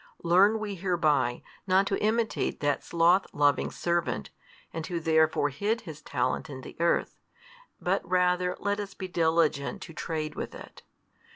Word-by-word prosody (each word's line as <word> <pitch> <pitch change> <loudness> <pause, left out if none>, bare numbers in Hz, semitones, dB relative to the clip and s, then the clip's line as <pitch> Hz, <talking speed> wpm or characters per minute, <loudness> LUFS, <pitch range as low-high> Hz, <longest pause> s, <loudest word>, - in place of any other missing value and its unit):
Learn 190 +6 +5
we 215 -2 -4
hereby, 155 -9 +1 0.2
not 190 +1 +4
to 195 - -1
imitate 220 +1 0
that 145 -1 0
sloth 175 +3 +3
loving 145 -1 +2
servant, 170 - -2 0.4
and 165 - -4
who 175 -3 -2
therefore 160 -2 +2
hid 210 - -1
his 155 -5 -9
talent - - -2
in 130 -2 -7
the - - -11
earth, 170 0 +1 0.6
but - - 0
rather 180 0 +1
let 205 0 -1
us 200 -2 -6
be 185 - -5
diligent 160 -1 +1
to 165 - -10
trade 155 -1 -3
with - - -6
it. - - -12
170 Hz, 155 wpm, -28 LUFS, 155-190 Hz, 0.6 s, Learn